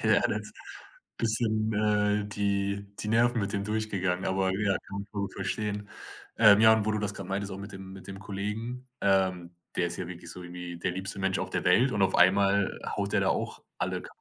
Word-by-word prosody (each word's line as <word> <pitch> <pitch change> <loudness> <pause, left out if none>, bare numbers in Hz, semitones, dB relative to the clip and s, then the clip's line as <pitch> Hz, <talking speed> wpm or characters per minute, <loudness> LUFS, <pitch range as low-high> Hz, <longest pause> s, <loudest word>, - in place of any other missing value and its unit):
Ja, - - +4
das - - -3 0.7
bisschen, 110 -1 +1
äh, 105 0 +2
die 100 0 -1
die 105 - -2
Nerven 115 +1 +3
mit 100 +1 -2
dem 100 -1 -1
durchgegangen, 100 -4 -1
aber 95 0 +1
ja, 100 0 +1
kann 100 +1 -5
man 100 - -8
schon 100 -1 -2
verstehen. 105 +1 -3 0.5
Ähm, 110 -2 +8
ja, 110 0 +8
und 110 -2 +1
wo 110 - +2
du 110 - 0
das 105 -1 -2
grad 100 -3 -6
meintest, 100 +1 -3
auch 95 - -6
mit 100 +1 -8
dem 95 0 -9
mit 95 -1 -11
dem 95 0 -7
Kollegen, 105 +6 -4
ähm 95 -3 +1 0.2
der 85 -1 +2
ist 85 - -5
ja 90 - -3
wirklich 85 -1 -8
so 90 - -9
irgendwie 90 -1 -7
der 90 - -1
liebste 95 +1 -4
Mensch 95 0 0
auf - - -3
der - - -1
Welt, 120 +8 +4
und 105 - -1
auf 95 - +3
einmal 100 +2 +4 0.2
haut - - -2
der - - +3
da - - +2
auch - - -2 0.2
alle - - -1
ka - - -11
100 Hz, 220 wpm, -29 LUFS, 95-105 Hz, 0.7 s, Ähm